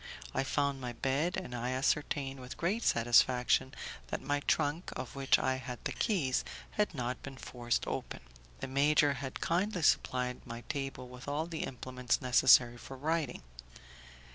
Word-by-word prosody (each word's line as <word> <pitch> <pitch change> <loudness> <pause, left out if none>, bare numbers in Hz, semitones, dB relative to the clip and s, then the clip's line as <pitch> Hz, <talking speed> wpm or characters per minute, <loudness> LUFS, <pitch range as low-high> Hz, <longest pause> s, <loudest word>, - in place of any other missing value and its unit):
I - - +1
found 140 0 0
my 125 -1 -4
bed, 140 +9 0
and 185 -10 -5
I 125 +1 -2
ascertained 135 0 0
with 125 0 -8
great 195 +7 0
satisfaction 125 - +4 0.4
that - - -3
my 145 0 -1
trunk, 145 +4 0
of 130 +1 -6
which 135 -1 +4
I 130 - 0
had 125 -1 -6
the - - -2
keys, 160 - +1 0.3
had 210 -5 0
not 125 -1 -3
been 135 -1 -8
forced 120 -2 -2
open. - - -4 0.4
The - - -3
major 145 +2 +4
had 135 0 -6
kindly 180 +1 0
supplied 125 -3 +1
my 115 0 -7
table 135 -3 -4
with 125 +2 -11
all 145 +3 -1
the 165 -1 -3
implements 125 -1 -2
necessary 125 -1 +5
for 135 - -9
writing. 155 - -1
135 Hz, 160 wpm, -32 LUFS, 125-145 Hz, 0.4 s, necessary